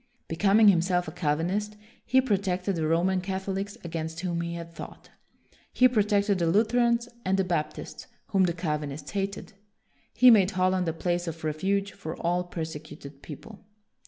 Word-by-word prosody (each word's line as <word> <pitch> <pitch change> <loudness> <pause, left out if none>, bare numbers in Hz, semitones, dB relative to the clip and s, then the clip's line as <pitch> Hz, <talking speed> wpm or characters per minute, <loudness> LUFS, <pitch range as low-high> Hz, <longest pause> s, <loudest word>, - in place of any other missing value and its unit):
Becoming 200 +5 +5
himself 180 -1 +2
a - - -5
Cal 155 -4 0
vinist, 205 +6 -2 0.3
he 260 +1 +3
protected 195 -5 -1
the 160 -2 -1
Roman 180 +3 +2
Catholics 195 +1 -4
against 160 -1 -5
whom 175 -2 -2
he 170 0 -4
had 170 0 -8
fought. - - -10 0.6
He 255 - +5
pro 240 -4 +2
tected 205 -1 +1
the 170 - +1
Lutherans 235 +5 +2 0.2
and 190 +1 +1
the 195 - +2
Baptists, 170 -4 -4 0.2
whom 190 -2 +3
the 170 - 0
Calvinists 150 -4 -4
hated. 200 +1 -4 0.6
He 250 0 +8
made 195 -5 +5
Holland 185 -1 +1
a 165 - 0
place 175 +1 -2
of 165 -1 -6
refuge 195 +6 -1
for 160 -5 -7
all 175 +1 0
perse 165 -2 -5
cuted 145 -2 -11
people. 200 +8 -11
180 Hz, 165 wpm, -27 LUFS, 165-200 Hz, 0.6 s, He